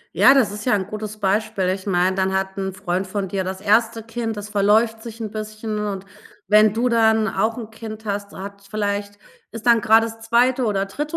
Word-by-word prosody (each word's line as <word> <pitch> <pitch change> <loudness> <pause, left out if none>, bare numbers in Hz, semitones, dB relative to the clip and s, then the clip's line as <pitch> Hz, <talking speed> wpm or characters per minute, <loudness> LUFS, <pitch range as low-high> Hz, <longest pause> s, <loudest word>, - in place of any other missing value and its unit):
Ja 275 - +7
das 255 -7 +3
ist 210 +1 -7
ja 250 - +3
'n 190 -2 -1
gutes 215 +1 -6
Beispiel 205 -1 0
ich 190 +1 -3
meine 185 0 +2
dann 190 0 0
hat 190 0 -3
'n 190 0 -2
Freund 185 0 -3
von 195 +1 -3
dir 190 0 -2
das 190 +1 -5
1. 225 +2 +2
Kind 225 -1 -4
das 205 0 -6
verläuft 215 +2 +2
sich 230 0 -9
'n 220 -2 -5
bisschen 215 0 -5
und 200 -2 -4 0.4
wenn 210 +1 +6
du 230 +4 0
dann 220 -2 +3
auch 225 +1 0
'n 225 -3 -7
Kind 220 -1 -9
hast 200 -1 -3
hat 200 +1 -9
vielleicht 205 -1 -2 0.3
ist 230 -1 -9
dann 235 -2 +5
grade 225 +2 +5
das 225 0 -8
2. 245 +3 +2
oder 200 -3 0
dritte 295 +11 -5
215 Hz, 215 wpm, -21 LUFS, 200-225 Hz, 0.4 s, Ja